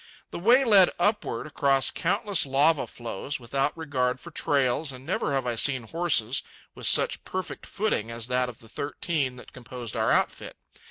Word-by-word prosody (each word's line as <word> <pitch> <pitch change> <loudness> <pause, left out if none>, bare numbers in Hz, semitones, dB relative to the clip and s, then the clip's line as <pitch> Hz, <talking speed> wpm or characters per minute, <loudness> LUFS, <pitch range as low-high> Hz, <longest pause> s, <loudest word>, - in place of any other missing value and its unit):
The - - -5
way 245 +8 +5
led 200 -6 +6
upward 205 +5 0
across 140 -4 +2
countless 200 +1 +1
lava 140 +3 +3
flows, 120 +4 -5
without 135 +5 -1
regard 130 -5 -1
for - - -11
trails, 140 +1 +1
and 130 0 -11
never 185 -2 -1
have 135 -2 0
I 120 - 0
seen 130 +2 +1
horses 135 -4 +1 0.3
with - - -3
such - - +2
perfect 185 0 -5
footing 195 - -1
as 115 -1 -5
that 125 0 0
of 120 - -12
the 115 - -15
thirteen 140 0 -2
that 125 - -13
composed 125 -2 -8
our - - +1
outfit. - - 0
135 Hz, 170 wpm, -26 LUFS, 125-170 Hz, 0.3 s, led